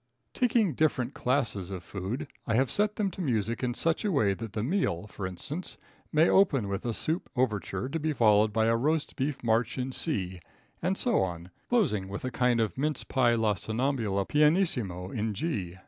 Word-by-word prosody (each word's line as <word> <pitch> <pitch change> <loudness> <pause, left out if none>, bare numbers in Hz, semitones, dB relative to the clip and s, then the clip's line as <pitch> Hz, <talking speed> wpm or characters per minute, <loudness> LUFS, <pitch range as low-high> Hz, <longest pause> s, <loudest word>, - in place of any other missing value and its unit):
Taking 230 -8 +2
different 140 -4 0
classes 120 -8 0
of 95 -3 -6
food, 100 - -4 0.2
I 110 - +1
have 130 +1 +2
set 210 0 +1
them 200 -3 0
to 185 - -7
music 115 - -1
in 125 -2 -1
such 165 +7 +1
a 210 - +1
way 110 - +2
that 110 +2 -7
the 105 - -2
meal, 125 - 0
for 100 -2 -5
instance, 145 - -6 0.3
may 155 +2 +4
open 145 - +3
with 100 +1 -3
a - - +1
Soup 160 +3 -1
Overture, 105 -4 -1
to 165 - -2
be 155 +1 0
followed 110 -5 +4
by 110 +1 +2
a 115 0 +3
Roast 150 +6 0
Beef 135 0 -2
March 115 +1 +1
in 130 +1 -2
C, 95 - -1 0.4
and 185 +3 0
so 240 -3 +2
on, 85 -1 -4 0.2
closing 130 - +1
with 100 +5 -5
a 130 - -2
kind 125 -1 +2
of 110 +3 -1
Mince 150 0 0
Pie 120 -3 +2
La 110 -2 +2
Somnambula 110 -1 -1
pianissimo 145 - +2
in 110 -2 -2
G. 95 - -3
120 Hz, 195 wpm, -29 LUFS, 105-155 Hz, 0.4 s, may